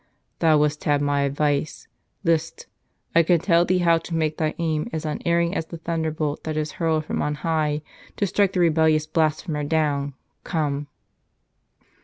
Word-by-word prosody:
"Thou 160 -2 +4
wouldst 150 0 0
have 145 -1 +3
my 145 0 +1
advice. 145 +1 -1 0.4
List. 165 0 0 0.5
I 165 - +6
can 170 +1 +3
tell 170 0 +3
thee 185 +1 +2
how 165 -1 +5
to 165 +1 -6
make 155 -1 0
thy 155 -1 -1
aim 160 -2 -1
as 160 -1 -4
unerring 170 +3 0
as 160 -5 -2
the 170 - -7
thunderbolt 160 -2 -2
that 155 -1 -3
is 155 0 -2
hurled 160 -2 +1
from - - -2
on 150 0 -1
high 155 -1 -1 0.3
to 205 - +1
strike 195 0 +1
the 180 - +1
rebellious 160 -2 +3
blasphemer 155 -1 0
down. 145 -3 0 0.3
Come." 145 -4 -2
155 Hz, 165 wpm, -23 LUFS, 150-165 Hz, 0.5 s, I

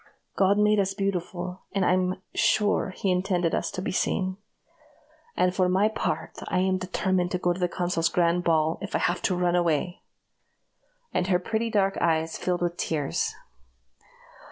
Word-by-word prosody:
God 195 +1 +3
made 210 0 +4
us 195 0 0
beautiful, 185 -2 -3
and 195 -2 +1
I'm 185 +1 +1
sure 210 -2 +2
he 185 +1 -1
intended 180 -2 0
us - - 0
to 185 - -5
be - - -2
seen. 185 0 -1 1.0
And 180 0 +3
for 185 -1 +2
my 195 +4 +3
part, 165 -7 -3
I - - -1
am 185 0 +1
determined 185 0 0
to - - +2
go 175 -1 +1
to 180 - -8
the 180 - +2
consul's 175 -2 0
grand 175 0 +2
ball, 160 -1 +2
if 200 - -4
I - - +4
have 175 +1 0
to 185 - +1
run 175 0 +1
away!" 175 0 0 1.1
and 180 - 0
her 185 -2 +3
pretty 225 +5 -2
dark 195 -3 +1
eyes 160 -1 +1
filled 180 -1 -1
with 175 0 -1
tears. 150 -4 -1
180 Hz, 170 wpm, -26 LUFS, 175-190 Hz, 1.1 s, made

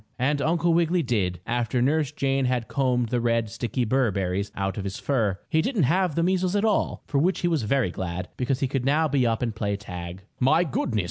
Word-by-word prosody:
And 140 +3 +1
Uncle 170 +2 +2
Wiggily 170 +1 +2
did, 95 - -1
after 120 +1 -1
Nurse 145 +3 +1
Jane 135 -2 0
had 125 -2 0
combed 125 -4 0
the 120 0 0
red, 115 -2 0
sticky 120 +1 -2
burr 130 +1 +2
berries 95 +1 -2
out 95 -1 -2
of - - -3
his 95 -1 -4
fur. 110 -9 0
He 160 - +2
didn't 215 - 0
have 175 +3 +2
the 165 - +1
measles 185 +1 +1
at 205 +2 +2
all, 215 - 0
for 140 - 0
which 180 +6 +1
he 175 - +1
was 165 -5 +1
very 115 -2 +1
glad, 90 0 -4
because 130 +1 -1
he 135 - +2
could 135 -1 -2
now 150 +4 +2
be 135 -5 +2
up 115 +1 0
and 115 -2 -1
play 100 -2 -1
tag. 90 -2 -8 0.2
"My 150 +7 +4
goodness! 130 -7 -1
125 Hz, 225 wpm, -25 LUFS, 110-155 Hz, 0.2 s, My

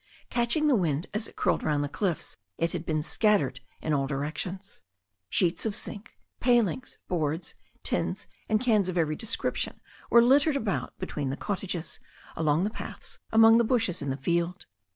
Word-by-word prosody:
Catching 240 +6 +2
the 290 -4 +5
wind 165 -6 0
as 215 +2 -2
it - - -15
curled - - +1
round 150 -2 +1
the - - -1
cliffs, 175 +2 -2 0.2
it 165 0 0
had 170 -2 -5
been 155 -1 0
scattered 200 - +2 0.2
in 155 - 0
all 135 -2 +1
directions. 160 +8 -4 0.5
Sheets 175 -1 +2
of 220 -3 0
zinc, 215 +4 -7 0.2
palings, 240 -1 +1
boards, 160 -1 -2 0.3
tins - - -1 0.2
and 215 -1 +3
cans 215 -6 +2
of 180 - -3
every 155 -2 +1
description 225 +8 -1 0.3
were 235 0 +7
littered 280 +4 +4
about 220 -7 -2
between 150 -7 -3
the 135 - -3
cottages, 185 -4 -3 0.4
along 160 +1 +2
the 210 - 0
paths, - - -7
among 225 +1 +7
the - - +4
bushes 225 -6 +1
in 140 - -3
the 135 - -2
field. 170 +5 -1
185 Hz, 170 wpm, -28 LUFS, 155-225 Hz, 0.5 s, were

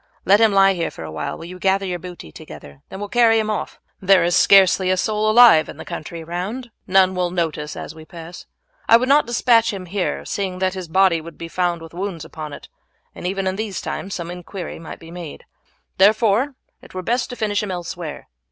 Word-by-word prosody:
Let 200 +3 +5
him 220 -2 +5
lie 195 0 +5
here 170 -3 -2
for - - -10
a 80 - -7
while, 80 - -4
while 165 - -9
you 180 +1 -9
gather 195 +1 +1
your 180 -2 -3
booty 175 - -10
together; 70 -2 -12
then - - -8
we - - -9
will 205 - -4
carry 230 0 +4
him 215 -1 0
off. 215 - -4 0.2
There 190 -2 +5
is 175 +1 +1
scarcely 190 -1 +5
a 185 - +2
soul 215 +2 0
alive 220 -8 +7
in - - -9
the - - -9
country 165 +1 -7
round, 180 +10 -4
and 240 - -23 0.2
none 190 0 +4
will 180 -1 -1
note 170 -3 -1
us 150 0 -6
as - - -7
we 160 0 -12
pass. 165 +2 -11 0.4
I 230 - +9
would 255 +2 -1
not 285 0 +4
despatch 230 -1 +3
him 195 -3 -6
here, 185 +1 -3
seeing 190 -2 -3
that 185 0 0
his 185 -2 -6
body 180 -1 +3
would 165 0 -11
be 165 - -7
found 175 -1 -1
with 165 - -12
wounds 175 -3 -5
upon 155 -2 -8
it, - - -10 0.5
and - - -6
even 195 +1 -2
in 190 0 -1
these 215 -3 -3
times 195 - -5
some 170 -1 -5
inquiry 180 +1 -7
might 165 - -9
be 165 0 -13
made; 170 -3 -9 0.5
therefore 220 +6 +3 0.3
it - - -16
were 185 - -4
best 245 +6 -1
to 245 - -6
finish 210 -3 -1
him 210 - -4
elsewhere. 175 -3 -6
185 Hz, 235 wpm, -21 LUFS, 170-205 Hz, 0.5 s, I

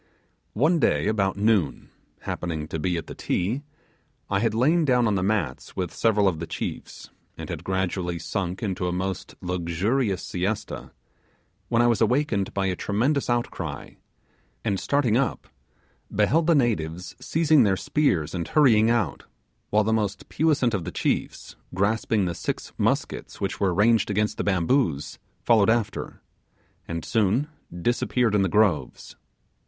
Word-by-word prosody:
One, 155 +9 +3
day 75 - +2
about 100 -2 0
noon, 100 -8 +1 0.3
happening 80 -3 -4
to 80 - -3
be 90 +2 0
at 80 - -4
the - - -8
Ti, 105 +10 -1 0.7
I 100 - +2
had 110 0 0
lain 155 +9 +3
down 125 -4 +3
on 105 - +2
the 95 - 0
mats 100 -3 -2
with 90 -3 -3
several 105 -3 +2
of 85 -4 0
the 85 - -5
chiefs, - - -6 0.3
and - - -6
had - - -5
gradually 95 -2 -1
sunk 90 +4 -3
into 95 -3 -2
a - - 0
most 95 +1 -4
luxurious 90 +5 -1
siesta, 95 +4 -3 0.8
when 120 0 +3
I - - +4
was 115 -1 +2
awakened 115 -4 +1
by 100 -1 -1
a 95 -1 0
tremendous 125 +11 0
outcry, 90 -11 -3 0.7
and 100 -2 0
starting 135 -6 +2
up 135 - -1 0.6
beheld 135 +11 +2
the 170 - +5
natives 90 - -1
seizing 155 -2 +3
their 95 -3 +3
spears 95 - 0
and 85 -3 -3
hurrying 115 -7 +4
out, 120 -1 0 0.4
while 105 +1 +3
the 110 +2 +1
most 105 -2 -2
puissant 145 -7 +2
of 95 -4 -1
the - - -5
chiefs, - - -2 0.2
grasping 105 +1 +1
the 85 - -2
six - - -4
muskets - - -1
which - - -3
were 95 -2 +2
ranged 105 +3 +3
against 105 +1 0
the - - -1
bamboos, 95 - 0 0.2
followed 110 -3 +4
after, 110 -2 -1 0.6
and 85 -1 -4
soon 115 +5 +1 0.4
disappeared 120 -1 +1
in 105 - +3
the 95 - +1
groves. 105 -5 +1
105 Hz, 155 wpm, -25 LUFS, 90-120 Hz, 0.8 s, the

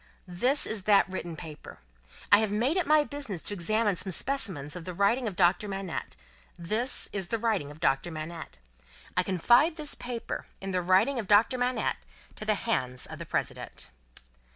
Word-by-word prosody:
This 245 +11 +2
is 210 -4 -3
that 205 -2 +5
written 175 -3 -5
paper. 155 -2 -10 0.5
I 205 - +8
have 215 -2 0
made 240 +9 +1
it 370 -5 0
my 305 0 +5
business 280 - -6
to - - -1
examine 205 +2 +1
some 190 +2 -1
specimens 180 - -1
of 180 - -7
the 180 +1 -6
writing 230 +6 +2
of 200 - -4
Doctor 180 +2 +3
Manette. 195 -3 -5 0.4
This 215 +9 +2
is 195 -3 -2
the 230 - -1
writing 215 -10 -1
of 145 +1 -12
Doctor 135 +1 +1
Manette. 160 - -7 0.6
I - - +4
confide 240 - +3
this 305 -3 -1
paper, 245 -2 -5
in 195 0 -5
the 185 -1 0
writing 190 +9 +3
of 215 - -4
Doctor 210 +5 +5
Manette, 245 - 0 0.4
to - - -6
the - - +2
hands 125 0 -2
of - - -9
the - - -7
President." - - -4
200 Hz, 180 wpm, -28 LUFS, 175-240 Hz, 0.6 s, I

